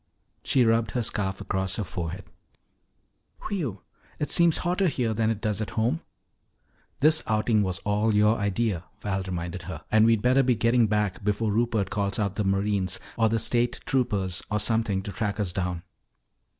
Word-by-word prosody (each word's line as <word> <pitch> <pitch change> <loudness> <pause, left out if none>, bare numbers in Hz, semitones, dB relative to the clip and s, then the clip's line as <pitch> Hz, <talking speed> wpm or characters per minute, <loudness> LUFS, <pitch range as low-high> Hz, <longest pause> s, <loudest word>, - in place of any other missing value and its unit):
She 130 -4 +3
rubbed 115 0 +2
her 120 - +1
scarf 95 -3 -2
across 95 0 -2
her 110 - -2
forehead. 90 0 -5 1.2
"Whew! 140 - -3 0.3
It 150 - -2
seems 170 -2 +4
hotter 180 +2 +2
here 125 -7 0
than 110 0 +1
it 110 -2 -2
does 105 -2 -1
at 110 - -3
home." 120 +9 +1 1.0
"This 155 +2 +4
outing 110 0 +2
was 95 -2 -1
all 105 +2 +2
your 105 +1 +4
idea," 100 -3 -1 0.2
Val 95 -2 -1
reminded 90 -1 -4
her. - - -7
"And 110 +1 +5
we'd 115 -2 +3
better 130 +2 +4
be 125 -2 +2
getting 115 +1 +3
back 105 -2 -1
before 105 +1 0
Rupert 110 -2 0
calls 100 -3 -1
out 100 -3 0
the 105 - -1
Marines 95 -1 0 0.2
or 115 -2 +3
the 115 - +1
State 120 +2 0
Troopers 100 -9 0
or 105 -1 0
something 110 -3 +1
to 100 - -5
track 105 0 -3
us 95 -4 -1
down." 90 -2 -2
105 Hz, 175 wpm, -26 LUFS, 95-115 Hz, 1.2 s, And